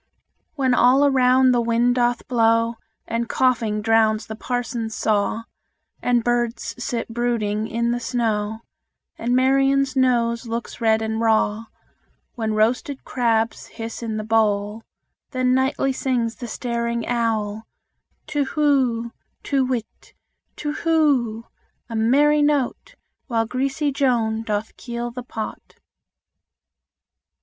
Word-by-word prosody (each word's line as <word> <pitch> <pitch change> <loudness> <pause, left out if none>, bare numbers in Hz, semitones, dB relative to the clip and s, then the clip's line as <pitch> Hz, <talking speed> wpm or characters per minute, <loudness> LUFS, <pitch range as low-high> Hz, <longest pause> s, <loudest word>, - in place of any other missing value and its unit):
When 265 -3 +1
all 260 +4 +5
aloud 260 -1 +4
the 245 -1 +2
wind 235 +1 +2
doth 245 -1 0
blow, 230 -1 +2 0.3
And 230 +1 -2
coughing 225 -5 +1
drowns 220 -1 +3
the 220 - -7
parson's 235 -2 -3
saw, 215 +1 0 0.6
And 240 -1 +2
birds 240 -1 -1
sit 235 -1 -3
brooding 225 -3 -1
in 235 +1 -1
the 240 - -1
snow, 225 -2 -1 0.6
And 240 +2 0
Marian's 270 +1 +3
nose 235 -2 +1
looks 230 +1 -5
red 220 -1 +3
and 220 0 -2
raw 220 -1 +2 0.7
When 220 -3 -2
roasted 245 +5 0
crabs 230 -2 0
hiss 225 +1 -7
in 220 -2 -3
the 215 - -3
bowl, 210 -1 +1 0.5
Then 255 -1 +1
nightly 265 +1 +1
sings 240 -4 -1
the 240 - -6
staring 235 0 -2
owl, 220 -2 -1 0.6
Tu 295 -2 -1
who; 265 -6 +1 0.3
Tu 275 -2 +1
whit, 250 -4 -5 0.4
tu 295 - -3
who: 280 -10 +1 0.4
a 230 - -5
merry 285 +7 +4
note, 290 - 0 0.3
While 230 -3 0
greasy 275 +5 -1
Joan 235 -5 +1
doth 215 -1 -3
keel 240 -1 -5
the 250 +1 -6
pot. 225 -3 -7
235 Hz, 125 wpm, -22 LUFS, 225-255 Hz, 0.7 s, all